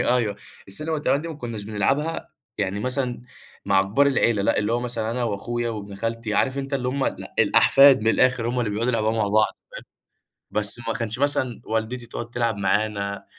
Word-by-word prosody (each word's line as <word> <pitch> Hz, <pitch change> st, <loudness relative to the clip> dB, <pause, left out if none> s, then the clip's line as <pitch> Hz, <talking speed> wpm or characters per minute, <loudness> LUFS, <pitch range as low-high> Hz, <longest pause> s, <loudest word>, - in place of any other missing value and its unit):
أيوه، 120 Hz, -5 st, +1 dB, 0.3 s
السلِّم 155 Hz, +11 st, 0 dB
والتِّعبان 145 Hz, -2 st, +1 dB
دي 165 Hz, -, -6 dB
ما 160 Hz, -, -6 dB
كنّاش 115 Hz, -7 st, -6 dB
بنلعبها 135 Hz, +10 st, -1 dB, 0.3 s
يعني 100 Hz, 0 st, -2 dB
مثلًا 125 Hz, 0 st, -1 dB, 0.4 s
مع 95 Hz, -1 st, +3 dB
كبار 110 Hz, +9 st, +2 dB
العيلة، 120 Hz, -6 st, +2 dB
لأ، -, -, +1 dB
اللي 105 Hz, +2 st, 0 dB
هو 120 Hz, -, +1 dB
مثلًا 115 Hz, -2 st, -2 dB
أنا 120 Hz, 0 st, -2 dB
وأخويا 120 Hz, +3 st, -2 dB
وابن 105 Hz, -2 st, -7 dB
خالتي، 115 Hz, +1 st, -3 dB
عارف 130 Hz, +6 st, +1 dB
أنت 135 Hz, 0 st, -3 dB
اللي 125 Hz, -2 st, -1 dB
هُم 135 Hz, +1 st, -1 dB
ال -, -, -3 dB
الأحفاد 135 Hz, -2 st, +6 dB
من 110 Hz, -, 0 dB
الآخِر 125 Hz, 0 st, +2 dB
هُم 125 Hz, +1 st, -2 dB
اللي 110 Hz, -, -1 dB
بيقعُدوا 115 Hz, +4 st, -1 dB
يلعبوها 110 Hz, -2 st, 0 dB
مع 110 Hz, -2 st, 0 dB
بعض 110 Hz, +1 st, +4 dB, 0.9 s
فاهم، -, -, -7 dB
بس 105 Hz, +3 st, +5 dB
ما 115 Hz, -, 0 dB
كانش 115 Hz, -1 st, -3 dB
مثلًا 140 Hz, -3 st, +1 dB
والدتي 115 Hz, +2 st, -3 dB
تقعُد 120 Hz, 0 st, -7 dB
تلعب 115 Hz, -2 st, -1 dB
معانا، 100 Hz, 0 st, -1 dB
115 Hz, 195 wpm, -23 LUFS, 105-125 Hz, 0.9 s, الأحفاد